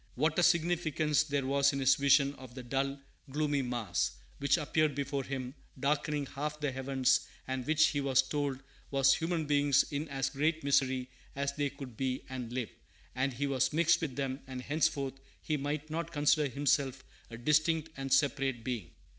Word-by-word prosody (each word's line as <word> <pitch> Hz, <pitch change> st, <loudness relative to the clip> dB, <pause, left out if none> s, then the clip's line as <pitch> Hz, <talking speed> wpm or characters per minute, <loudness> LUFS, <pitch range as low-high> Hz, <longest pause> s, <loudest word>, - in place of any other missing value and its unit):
What 155 Hz, +6 st, +1 dB
a -, -, +4 dB
significance 165 Hz, -3 st, +2 dB
there 145 Hz, -3 st, -1 dB
was 140 Hz, +1 st, +3 dB
in 140 Hz, -, -2 dB
his 135 Hz, 0 st, +5 dB
vision 140 Hz, 0 st, +4 dB
of 130 Hz, -2 st, -12 dB
the 130 Hz, -, -7 dB
"dull, 135 Hz, +2 st, -1 dB, 0.3 s
gloomy 145 Hz, 0 st, 0 dB
mass" 120 Hz, -4 st, -1 dB, 0.3 s
which 140 Hz, +3 st, +3 dB
appeared 155 Hz, -2 st, +1 dB
before 140 Hz, -1 st, -2 dB
him, 130 Hz, -1 st, -5 dB, 0.3 s
darkening 145 Hz, +1 st, 0 dB
half 150 Hz, +3 st, -4 dB
the 145 Hz, -2 st, -1 dB
heavens, 130 Hz, 0 st, +1 dB, 0.2 s
and 130 Hz, -1 st, -3 dB
which 155 Hz, 0 st, +4 dB
he 145 Hz, -, -1 dB
was 135 Hz, -1 st, +3 dB
told 140 Hz, -2 st, -2 dB, 0.3 s
was 135 Hz, -1 st, +4 dB
"human 165 Hz, -1 st, -1 dB
beings 145 Hz, -1 st, +4 dB
in 145 Hz, +2 st, -2 dB
as 135 Hz, -1 st, -1 dB
great 155 Hz, +3 st, 0 dB
misery 130 Hz, -2 st, +1 dB, 0.2 s
as 140 Hz, 0 st, -1 dB
they 145 Hz, 0 st, -1 dB
could 135 Hz, -4 st, -10 dB
be 130 Hz, -1 st, -2 dB
and 125 Hz, -3 st, -5 dB
live; 125 Hz, -2 st, -3 dB, 0.4 s
and 130 Hz, +1 st, 0 dB
he 140 Hz, +4 st, -2 dB
was 135 Hz, -1 st, +1 dB
mixed 170 Hz, +2 st, +3 dB
with 145 Hz, -6 st, -3 dB
them, 135 Hz, -1 st, -2 dB
and 130 Hz, -1 st, -6 dB
henceforth 145 Hz, -3 st, 0 dB, 0.2 s
he 155 Hz, -, -2 dB
might 150 Hz, +2 st, -3 dB
not 165 Hz, +1 st, -3 dB
consider 150 Hz, -1 st, +3 dB
himself 135 Hz, -1 st, 0 dB, 0.3 s
a 115 Hz, -, -8 dB
distinct 155 Hz, +5 st, +2 dB
and 135 Hz, 0 st, -5 dB
separate 135 Hz, -3 st, +2 dB
being"! 115 Hz, -8 st, -4 dB
140 Hz, 180 wpm, -32 LUFS, 130-150 Hz, 0.4 s, his